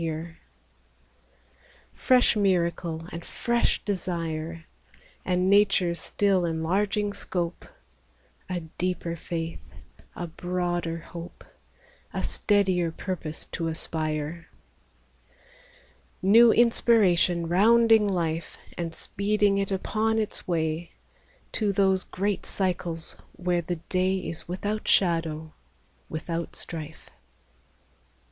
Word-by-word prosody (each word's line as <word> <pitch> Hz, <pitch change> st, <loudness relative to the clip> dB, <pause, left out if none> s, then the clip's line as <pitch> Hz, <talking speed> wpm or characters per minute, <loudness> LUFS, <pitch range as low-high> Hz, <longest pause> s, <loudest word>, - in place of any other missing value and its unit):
li 165 Hz, -, -1 dB
30 155 Hz, -1 st, -2 dB
EASTER -, -, -6 dB
CAROLS 165 Hz, -1 st, -12 dB, 1.6 s
Fresh 250 Hz, -2 st, +4 dB
miracle 170 Hz, -4 st, 0 dB
and 170 Hz, -, -6 dB
fresh 235 Hz, 0 st, 0 dB
desire, 165 Hz, -4 st, -3 dB, 0.6 s
And 180 Hz, 0 st, +1 dB
nature's 195 Hz, -4 st, +4 dB
still 195 Hz, -3 st, +1 dB
enlarging 195 Hz, +5 st, 0 dB
scope, 175 Hz, -3 st, -3 dB, 0.8 s
A 180 Hz, -1 st, -2 dB, 0.2 s
deeper 175 Hz, -2 st, -1 dB
faith, 165 Hz, 0 st, -4 dB, 0.6 s
a 175 Hz, -, -4 dB
broader 175 Hz, 0 st, -2 dB
hope, 170 Hz, +1 st, -10 dB, 0.7 s
A -, -, -1 dB
steadier 190 Hz, -5 st, +2 dB
purpose 165 Hz, -3 st, -5 dB
to 165 Hz, -, -2 dB
aspire; 160 Hz, +1 st, -3 dB, 1.8 s
New 225 Hz, +4 st, +7 dB
inspiration 195 Hz, -8 st, +3 dB
rounding 220 Hz, +4 st, +5 dB
life, 165 Hz, -4 st, -2 dB, 0.2 s
And 165 Hz, -1 st, -3 dB
speeding 205 Hz, 0 st, +1 dB
it 195 Hz, 0 st, -1 dB
upon 220 Hz, +3 st, 0 dB
its 215 Hz, -2 st, -1 dB
way, 160 Hz, -1 st, -1 dB, 0.6 s
To 210 Hz, -2 st, +1 dB
those 190 Hz, -1 st, +2 dB
great 200 Hz, +1 st, -2 dB
cycles 175 Hz, -3 st, -2 dB, 0.2 s
where 175 Hz, -1 st, 0 dB
the 175 Hz, +1 st, -3 dB
day 185 Hz, +3 st, 0 dB
Is 170 Hz, -3 st, -5 dB
without 205 Hz, +4 st, -3 dB
shadow, 160 Hz, -3 st, +1 dB, 0.6 s
without 165 Hz, +1 st, -4 dB
strife. 160 Hz, -1 st, -7 dB
175 Hz, 100 wpm, -27 LUFS, 165-200 Hz, 1.8 s, New